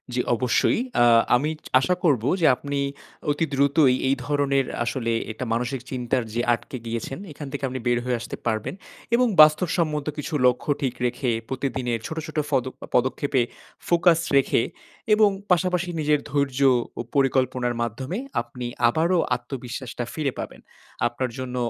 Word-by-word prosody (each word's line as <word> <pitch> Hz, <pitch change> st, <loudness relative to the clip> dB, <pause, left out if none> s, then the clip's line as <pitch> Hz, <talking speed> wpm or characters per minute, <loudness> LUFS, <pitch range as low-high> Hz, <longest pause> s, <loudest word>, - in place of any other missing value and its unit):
জি -, -, 0 dB, 0.2 s
অবশ্যই। 125 Hz, +1 st, +2 dB, 0.2 s
আ -, -, +7 dB, 0.3 s
আমি 145 Hz, +5 st, +1 dB, 0.3 s
আশা 180 Hz, +7 st, +1 dB
করব 140 Hz, -10 st, +3 dB, 0.2 s
যে -, -, +4 dB
আপনি 140 Hz, +2 st, -4 dB, 0.5 s
অতি 145 Hz, +3 st, 0 dB
দ্রুতই 140 Hz, 0 st, +4 dB
এই 135 Hz, -, +3 dB
ধরনের 140 Hz, -2 st, +1 dB, 0.2 s
আসলে 120 Hz, -1 st, -2 dB, 0.2 s
এটা 110 Hz, +4 st, -5 dB
মানসিক 125 Hz, +2 st, -2 dB
চিন্তার 125 Hz, -1 st, -1 dB
যে 120 Hz, -, 0 dB
আটকে 120 Hz, +2 st, -5 dB
গিয়েছেন 115 Hz, +5 st, -4 dB
এখান 145 Hz, -1 st, -8 dB
থেকে 140 Hz, -1 st, -5 dB
আপনি 130 Hz, 0 st, -4 dB
বের 120 Hz, 0 st, +3 dB
হয়ে 125 Hz, -1 st, 0 dB
আসতে -, -, -6 dB
পারবেন। 110 Hz, +7 st, -1 dB, 0.4 s
এবং 250 Hz, +1 st, +3 dB
বাস্তবসম্মত 155 Hz, -1 st, +3 dB
কিছু 150 Hz, -, -5 dB
লক্ষ্য 125 Hz, +4 st, 0 dB
ঠিক 130 Hz, -3 st, 0 dB
রেখে 125 Hz, +1 st, -1 dB, 0.2 s
প্রতিদিনের 130 Hz, -3 st, -2 dB
ছোট, 160 Hz, -, -6 dB
ছোট 155 Hz, -, -8 dB
ফদ 135 Hz, -4 st, +2 dB, 0.3 s
পদক্ষেপে 130 Hz, +1 st, +1 dB, 0.5 s
ফোকাস 170 Hz, -1 st, +4 dB, 0.2 s
রেখে, 130 Hz, -3 st, +3 dB, 0.5 s
এবং 210 Hz, -1 st, +6 dB, 0.2 s
পাশাপাশি 180 Hz, 0 st, +2 dB
নিজের 150 Hz, -1 st, +2 dB
ধৈর্য 140 Hz, -2 st, 0 dB, 0.4 s
ও -, -, +1 dB
পরিকল্পনার 130 Hz, -3 st, +1 dB
মাধ্যমে 130 Hz, -, -3 dB, 0.2 s
আপনি 125 Hz, -1 st, -8 dB, 0.2 s
আবারও 170 Hz, +8 st, +2 dB, 0.2 s
আত্মবিশ্বাস 125 Hz, 0 st, -6 dB
টা 120 Hz, -, -2 dB
ফিরে 150 Hz, -4 st, -1 dB
পাবেন। -, -, -7 dB, 0.5 s
আপনার 125 Hz, +2 st, -3 dB
জন্য 130 Hz, -1 st, -5 dB
135 Hz, 150 wpm, -24 LUFS, 125-150 Hz, 0.5 s, আ